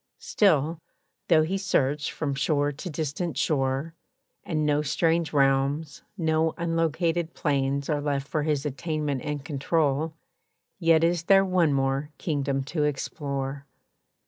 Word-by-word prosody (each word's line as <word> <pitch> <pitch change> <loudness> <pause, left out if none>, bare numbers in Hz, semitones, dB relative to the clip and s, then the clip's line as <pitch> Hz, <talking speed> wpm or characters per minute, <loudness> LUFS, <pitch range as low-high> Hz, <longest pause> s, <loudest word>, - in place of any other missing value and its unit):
Still, 160 -5 +2 0.5
though 160 -3 +5
he 190 +5 -1
search 145 -6 0
from 145 -3 -2
shore 145 +1 +1
to 150 +6 -7
distant 155 0 -3
shore, 135 +2 0 0.5
And 155 -3 -1
no 150 0 +2
strange 165 +2 +1
realms, 140 +1 +1 0.2
no 160 -2 +1
unlocated 165 0 0
plains 140 -1 0
Are 150 -2 0
left 140 -2 -1
for 155 - -1
his 150 -1 -1
attainment 150 -1 -2
and 145 0 -4
control, 155 0 0 0.6
Yet 165 -2 +4
is 170 0 +1
there 195 +1 +6
one 180 -4 +2
more 135 +1 0
kingdom 140 -4 -1
to 150 +2 -2
explore. 140 -1 -3
150 Hz, 130 wpm, -26 LUFS, 140-165 Hz, 0.6 s, there